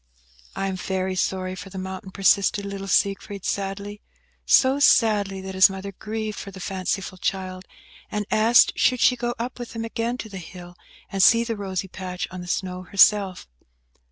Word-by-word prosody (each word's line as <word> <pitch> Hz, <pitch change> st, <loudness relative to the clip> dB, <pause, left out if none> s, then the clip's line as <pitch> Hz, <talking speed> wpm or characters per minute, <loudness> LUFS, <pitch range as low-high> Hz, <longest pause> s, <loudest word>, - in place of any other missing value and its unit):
"I 195 Hz, -, -2 dB
am 190 Hz, -1 st, -2 dB
very 190 Hz, 0 st, -2 dB
sorry 185 Hz, 0 st, -1 dB
for 185 Hz, +1 st, -8 dB
the 190 Hz, -, -9 dB
mountain," 190 Hz, +1 st, -6 dB
persisted 200 Hz, +1 st, +2 dB
little 195 Hz, 0 st, -6 dB
Siegfried, 200 Hz, +1 st, 0 dB
sadly; 200 Hz, +1 st, -3 dB, 0.5 s
so 265 Hz, +1 st, +5 dB
sadly 205 Hz, -8 st, +3 dB
that 190 Hz, 0 st, -7 dB
his 190 Hz, 0 st, +6 dB
mother 195 Hz, +1 st, -6 dB
grieved 215 Hz, +1 st, -5 dB
for -, -, -7 dB
the 190 Hz, -1 st, -11 dB
fanciful 190 Hz, 0 st, -3 dB
child, 185 Hz, -1 st, -3 dB, 0.4 s
and 210 Hz, 0 st, -3 dB
asked 225 Hz, +2 st, +5 dB
should 250 Hz, -1 st, +2 dB
she 250 Hz, -, +5 dB
go 240 Hz, 0 st, -3 dB
up 245 Hz, +2 st, -5 dB
with 240 Hz, -, -7 dB
him 225 Hz, -1 st, -4 dB
again 230 Hz, +1 st, -2 dB
to 225 Hz, -, -6 dB
the 195 Hz, -3 st, -8 dB
hill, 175 Hz, 0 st, -11 dB, 0.4 s
and 195 Hz, -, 0 dB
see 230 Hz, +4 st, +6 dB
the 230 Hz, -1 st, -3 dB
rosy 190 Hz, -2 st, -4 dB
patch 180 Hz, -1 st, -5 dB
on 185 Hz, -1 st, -7 dB
the 180 Hz, -, -9 dB
snow 180 Hz, 0 st, -3 dB
herself? 195 Hz, 0 st, +3 dB
195 Hz, 180 wpm, -24 LUFS, 185-215 Hz, 0.5 s, his